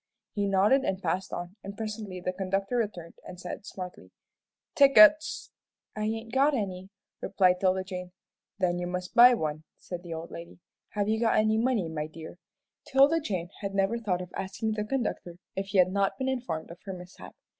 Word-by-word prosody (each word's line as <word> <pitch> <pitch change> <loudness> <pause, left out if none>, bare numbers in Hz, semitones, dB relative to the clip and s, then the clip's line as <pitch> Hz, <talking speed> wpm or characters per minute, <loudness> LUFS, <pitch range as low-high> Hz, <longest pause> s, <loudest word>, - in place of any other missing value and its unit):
He 205 -1 0
nodded 205 +8 +4
and 190 -6 -1
passed 185 0 -2
on, 175 +3 -6
and 200 +1 -8
presently 215 -4 -5
the 185 +1 -3
conductor 195 +4 -1
returned 185 -7 -4
and 180 - -10
said, 195 - -7
smartly, 180 - -8 0.6
"Tickets!" 275 +2 +6 0.4
"I 215 0 -2
ain't 225 +1 -3
got 280 +2 +4
any," 190 -4 -4 0.3
replied 180 -2 +2
'Tilda 190 0 +2
Jane. 180 -1 -7 0.5
"Then 175 -2 0
you 175 - -3
must 180 0 -4
buy 245 +1 +8
one," 155 -5 -3
said 180 -1 -7
the 170 -2 -6
old 165 +1 -7
lady; 170 0 -9 0.4
"have 205 -1 0
you 220 +1 +1
got 230 -1 +2
any 215 0 +3
money, 230 -7 +1
my 155 -1 -4
dear?" 160 +2 -11 0.5
'Tilda 280 +5 +5
Jane 185 - -3
never 195 +3 0
thought 185 -5 -1
of 180 - -13
asking 195 +3 -3
the 210 -1 -2
conductor 215 -8 -3 0.2
if 195 0 -3
he 195 - -1
had 185 0 +5
not 200 0 0
been 265 -1 -1
informed 175 -13 -3
of 170 - -11
her 195 - -5
mishap. 180 0 -11
195 Hz, 185 wpm, -28 LUFS, 180-220 Hz, 0.6 s, buy